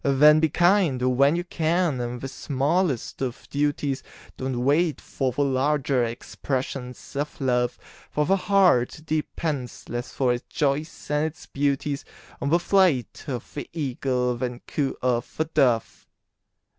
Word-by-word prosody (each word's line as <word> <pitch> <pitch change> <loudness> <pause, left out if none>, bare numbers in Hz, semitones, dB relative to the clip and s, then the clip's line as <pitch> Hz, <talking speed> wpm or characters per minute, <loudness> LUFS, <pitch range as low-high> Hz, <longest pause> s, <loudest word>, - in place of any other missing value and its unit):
Then 150 +2 +6
be 160 0 +3
kind 175 -4 +3 0.2
when 140 +4 +4
you 175 - -1
can 170 -4 0
in 120 0 -3
the 135 - -5
smallest 140 +2 -1
of 125 -2 -4
duties, 145 -1 0 0.3
Don't 130 -2 -3
wait 155 +3 +2
for 130 -2 -2
the 145 +4 0
larger 135 -1 +1
expressions 125 +2 -4
of 145 +2 -3
Love; 125 -2 +1 0.3
For 150 - 0
the 195 - +4
heart 185 -10 +3
depends 155 -3 -3
less 120 +1 -4
for 125 -2 +1
its 120 - -6
joys 150 +2 -1
and 150 +1 +2
its 160 +2 -10
beauties 140 0 -1 0.4
On 140 - 0
the 165 - +5
flight 175 -8 +2
of 125 -5 -5
the 145 - -6
Eagle 125 -4 -1
than 125 0 -4
coo 140 -3 -2
of 125 -2 0
the 160 - +1
Dove. 130 -8 +1
140 Hz, 145 wpm, -25 LUFS, 125-155 Hz, 0.4 s, Then